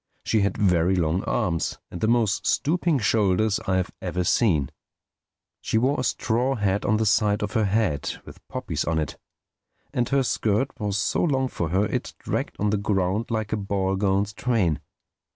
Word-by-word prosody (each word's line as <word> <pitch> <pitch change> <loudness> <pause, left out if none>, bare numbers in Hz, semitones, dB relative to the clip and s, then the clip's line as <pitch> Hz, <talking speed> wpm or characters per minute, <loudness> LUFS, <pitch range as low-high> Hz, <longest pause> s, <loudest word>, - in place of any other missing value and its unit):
She 110 - +2
had 100 - 0
very 90 -2 +3
long 85 +1 0
arms 85 -2 -1
and 85 - -7
the 110 - +2
most 115 -3 +1
stooping 165 +1 +1
shoulders 105 -2 +2
I 95 -1 +2
have 90 -1 -1
ever 90 - -2
seen. 80 - +2 0.9
She - - 0
wore 130 +5 +2
a - - 0
straw 125 +2 0
hat 100 -2 0
on 110 - +3
the 110 - +1
side 105 0 +2
of 105 - -3
her 110 -3 +2
head 100 -7 0
with - - -12
poppies - - -3
on 80 - 0
it; 75 -3 -3 0.7
and 120 -1 0
her 135 -1 +2
skirt 110 +1 +1
was 105 -2 -1
so 105 - 0
long 135 -5 +1
for 85 -8 -3
her 95 +5 +2
it - - -3
dragged - - -3
on 105 0 0
the 105 - +2
ground 100 +1 0
like 110 -2 -2
a - - +1
ball 100 -1 -1
gown's 100 +1 +1
train. 105 -9 +1
105 Hz, 185 wpm, -25 LUFS, 95-115 Hz, 0.9 s, very